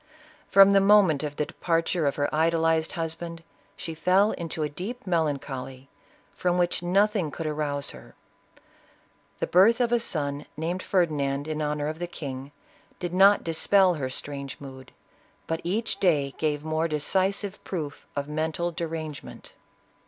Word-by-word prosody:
From 195 0 +8
the 200 0 +5
moment 195 -7 +5
of 145 -1 -4
the 150 - -1
departure 165 -1 0
of 140 - 0
her 145 0 +1
idolized 160 0 +2
husband, 165 0 -5 0.3
she 165 - -5
fell 185 +6 +3
into 165 -1 -4
a - - +1
deep 200 - -7
melancholy, 140 -6 -2 0.5
from 180 0 0
which 175 -1 +1
nothing 195 0 +2
could 165 +2 -6
arouse 150 -2 -2
her. - - -14 1.2
The - - -1
birth 210 +7 +5
of 240 -1 +1
a 240 - +4
son, 145 -9 -2
named 170 +4 -2
Ferdinand 145 -7 0
in 155 0 -3
honor 150 0 -1
of 155 +1 -4
the 175 - -3
kirtg, 135 -5 -6 0.5
did 175 -1 -4
not 195 +2 +6
dispel 185 +3 +4
her 140 -5 -3
strange 140 +1 -6
mood, 130 -2 -11 0.5
but 165 0 -3
each 210 +7 -2
day 145 -7 +2
gave 150 -2 0
more 160 +1 0
decisive 190 +6 -1
proof 155 -6 -5
of 140 0 -2
mental 160 +3 -2
derangement. 160 -3 -6
160 Hz, 150 wpm, -26 LUFS, 145-180 Hz, 1.2 s, From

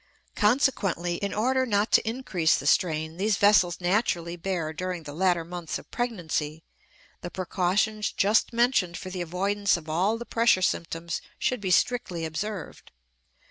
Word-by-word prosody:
Consequently, 205 - +1
in 200 +2 -3
order 260 +5 +1
not 210 -3 +1
to 220 - +4
increase 200 -10 +1
the - - -6
strain 160 0 +1
these 205 +1 +1
vessels 190 -4 +4
naturally 175 -2 0
bear 170 -3 -3
during 180 0 -4
the 145 -1 -8
latter 175 0 +1
months 170 -2 -5
of - - -15
pregnancy, 165 -9 -3 0.6
the 175 - -5
precautions 195 +4 0
just 210 +3 +2
mentioned 235 -7 +1
for 185 - -7
the 180 -1 -4
avoidance 195 +4 0
of 160 -2 -11
all 185 +8 +1
the 235 - -7
pressure 230 -6 +3
symptoms 170 -1 -2 0.2
should 250 -4 -1
be 190 - -2
strictly 180 -4 +1
observed. 185 +4 -6
185 Hz, 150 wpm, -26 LUFS, 170-215 Hz, 0.6 s, to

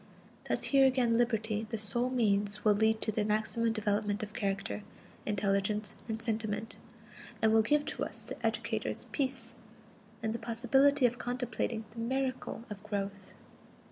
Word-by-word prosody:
Thus - - 0
here 270 -1 +6
again 250 -3 +3
liberty, 220 -2 +1
the 225 - -2
sole 225 +4 +1
means, 210 -4 +1
will 210 - +7
lead 220 +1 +2
to 215 - 0
the 215 0 0
maximum 220 +2 +1
development 210 -1 0
of 210 0 -6
character, 195 0 -2 0.5
intelligence 205 0 0
and 220 0 -2
sentiment; 220 -1 -2 0.6
and 220 0 +4
will 220 - +7
give 295 +6 +2
to - - -1
us, - - -5
the - - -7
educators, - - -1
peace, 265 -5 -2 0.7
and 220 0 0
the 235 - -3
possibility 255 +5 +3
of 245 0 +1
contemplating 245 -2 -2
the 230 - -9
miracle 255 0 -2
of 210 -3 -7
growth. 200 -2 -4
220 Hz, 150 wpm, -32 LUFS, 210-240 Hz, 0.7 s, will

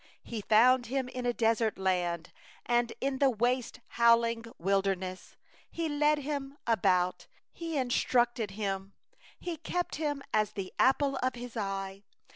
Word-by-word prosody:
10He 225 -3 -4
found 245 +3 +5
him 260 +1 -1
in 250 -1 -4
a - - +3
desert 225 -1 +1
land, 180 -3 -1 0.3
And 240 0 +2
in 270 0 -1
the 275 - +5
waste, 245 +1 0
a - - -27 0.2
howling 230 0 +4
wilderness; 190 0 -1 0.3
He 335 -1 -2
compassed 295 0 +2
him 280 -1 -4
about, 180 -5 +1 0.3
He 335 -1 -5
cared 255 -3 0 0.4
for 215 -4 -3
him, 195 -1 -3 0.5
He 345 -2 -4
kept 350 +2 -3
him 290 -3 -2
as 215 -1 +2
the 190 -2 -5
apple 275 +1 +3
of 255 0 -1
His 245 0 -8
eye. 195 -2 -3
235 Hz, 150 wpm, -30 LUFS, 195-270 Hz, 0.5 s, found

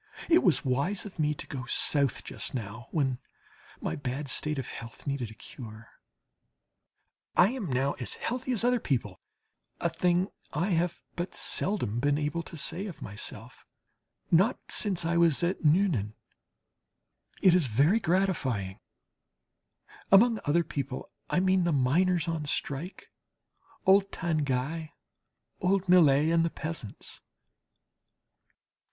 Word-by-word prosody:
It 340 +1 +6
was 175 -5 +2
wise 140 +12 0
of 190 -4 -10
me 150 -1 +1
to - - -7
go 130 -2 -6
South 140 -1 +3
just - - -3
now, 115 0 -6
when 135 -5 0 0.6
my - - -2
bad 135 +1 -4
state 150 +3 0
of 135 - -3
health 115 0 -9
needed 140 -5 -2
a 110 - -12
cure. 110 -1 -10 1.5
I 180 - +7
am 245 -6 -4
now 135 +1 0
as 125 - -3
healthy 250 +2 -3
as 235 -3 +1
other 245 0 +3
people 115 - -2 0.6
a 170 - +1
thing 180 +3 +1 0.2
I 170 +7 0
have 175 0 0
but 175 +2 -4
seldom 125 - -1
been 145 +2 +2
able 150 +3 -1
to 165 0 -10
say 190 +7 -2
of 180 - -8
myself 105 +3 -7 0.7
not 190 +8 +4
since 190 -6 +3
I 170 +1 +1
was 170 -1 +3
at 175 +1 -1
Nuenen. 150 - +2 1.2
It 185 - +5
is 175 -6 +3
very 145 - +3
gratifying 155 - 0 1.3
(among 225 +3 +6
"other 170 +4 +3
people," 140 -4 -5 0.2
I - - +2
mean, 185 0 +3
the 170 - +1
miners 165 +6 +2
on 165 -2 -2
strike, 145 +7 -4 0.7
old 195 +1 +5
Tanguy, 155 -1 -1 0.7
old 190 +1 +1
Millet, 155 -4 +5
and 165 0 +3
the 165 - +1
peasants). 155 -11 -6
160 Hz, 135 wpm, -29 LUFS, 135-185 Hz, 1.5 s, I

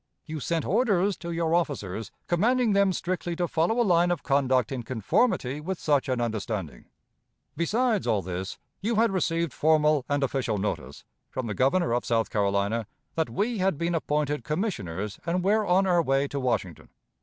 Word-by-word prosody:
You 155 -1 -5
sent 165 +3 -1
orders 205 -3 +2
to 170 - -7
your 165 -1 0
officers, 115 - -1 0.2
commanding 230 +5 +2
them 200 -1 +4
strictly 175 0 -2
to 175 +1 -1
follow 170 +10 +1
a - - +5
line 175 -2 +4
of 175 - -1
conduct 130 -4 +2
in 130 -2 -3
conformity 130 - 0
with 185 +3 -4
such 145 -3 +1
an 130 -1 0
understanding. 110 - -3 0.7
Besides 220 +5 +1
all 100 -3 +1
this, 95 +2 -5 0.2
you 225 +4 0
had 225 +1 +3
received 170 -4 0
formal 150 -2 +3
and 145 -1 +1
official 130 -5 -1
notice, 105 +2 -4 0.2
from 130 - -4
the 105 - -3
Governor 130 - +2
of 120 - 0
South 115 -1 0
Carolina, 100 +2 0 0.3
that 160 -1 -1
we 215 +3 -1
had 185 -4 +1
been 170 +2 -1
appointed 150 -2 -1
commissioners 105 - -3
and 175 +1 -1
were 210 +2 +2
on 185 +2 +4
our 175 -2 +3
way 135 -2 +1
to 140 - -3
Washington. 105 - -2
155 Hz, 175 wpm, -27 LUFS, 120-185 Hz, 0.7 s, a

